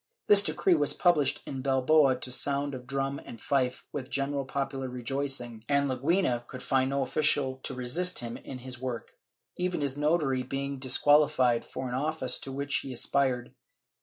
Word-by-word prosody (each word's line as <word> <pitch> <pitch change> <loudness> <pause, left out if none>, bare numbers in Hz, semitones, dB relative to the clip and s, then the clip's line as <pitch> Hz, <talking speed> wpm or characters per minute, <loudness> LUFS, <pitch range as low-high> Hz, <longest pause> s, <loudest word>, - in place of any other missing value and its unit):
This 205 -1 +8
decree 195 -2 +2
was 145 -3 +2
published 165 -6 +2
in 135 -1 -5
Bilbao 135 +1 +4
to 125 0 -4
sound 140 +2 +1
of 125 -1 -8
drum 135 +1 -2
and 115 - -10
fife, 130 -1 -1
with 130 -2 -5
general 140 0 -1
popular 135 -1 -3
rejoicing, 125 -2 -3
and 140 0 +2
Leguina 130 -2 0
could 130 -1 -9
find 130 -1 +1
no 140 0 0
official 135 -1 +1
to 130 -2 -4
assist 175 +9 0
him 120 -1 -4
in 130 - -8
his 125 0 -6
work, 125 -3 -5 0.5
even 180 -3 -1
his 140 -1 -1
notary 150 -3 +1
being 135 +1 -4
disqualified 130 -2 +3
for 130 - -6
an 125 - -5
office 135 -1 0
to 135 - -7
which 140 +1 -1
he 135 - -5
aspired. 125 -1 0
135 Hz, 170 wpm, -29 LUFS, 130-145 Hz, 0.5 s, This